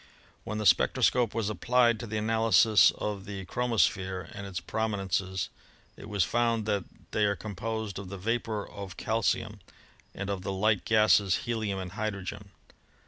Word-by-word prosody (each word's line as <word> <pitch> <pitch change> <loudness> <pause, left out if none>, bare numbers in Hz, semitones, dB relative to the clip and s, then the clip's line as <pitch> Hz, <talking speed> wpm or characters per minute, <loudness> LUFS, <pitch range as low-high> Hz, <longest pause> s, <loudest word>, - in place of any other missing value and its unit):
When 105 - -4
the 105 - -3
spectroscope 105 +6 +3
was 115 -3 0
applied 120 +3 +2
to 120 - -6
the 110 +1 -3
analysis 110 -2 +5
of 100 -2 -4
the 100 -2 -6
chro 125 +7 -2
mosphere 95 -5 0
and 100 -1 -7
its 95 -2 -4
prominences 95 -2 -2 0.5
it - - -11
was 100 -3 +2
found 115 +1 +1
that 100 -4 0 0.3
they 105 - +2
are 100 0 +1
composed 105 +2 -4
of 100 -2 -8
the 100 - -6
vapor 110 +1 -2
of 100 -2 -9
calcium 110 0 -1 0.6
and 100 0 -3
of 95 -2 -3
the 95 - -3
light 105 +1 +1
gases 105 -3 +4
helium 110 -4 -2
and 95 -2 -5
hydrogen. 100 -1 -5
105 Hz, 160 wpm, -29 LUFS, 95-110 Hz, 0.6 s, analysis